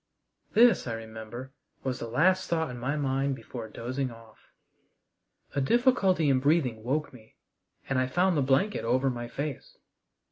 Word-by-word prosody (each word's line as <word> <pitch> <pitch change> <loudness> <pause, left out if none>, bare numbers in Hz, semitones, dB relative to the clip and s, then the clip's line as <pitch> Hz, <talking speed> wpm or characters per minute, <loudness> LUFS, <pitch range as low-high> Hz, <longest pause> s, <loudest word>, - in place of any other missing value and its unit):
This, 235 - +5
I 115 - -2
remember, 115 +3 -8 0.3
was 130 -1 -2
the 115 - -4
last 180 +10 +2
thought 160 -4 0
in 120 - -7
my 135 +5 -1
mind 135 -1 0
before 120 -3 -8
dozing 130 +4 -3
off. 115 -1 -16 1.1
A 140 - 0
difficulty 195 - +3
in 135 -2 +4
breathing 130 -6 +1
woke 145 +5 -1
me, 110 -3 -16 0.5
and 135 -1 +1
I 130 - +1
found 180 +7 +2
the 145 - +2
blanket 135 +11 +1
over 130 +3 +2
my 120 -1 -5
face. 140 +2 -6
135 Hz, 155 wpm, -28 LUFS, 120-155 Hz, 1.1 s, This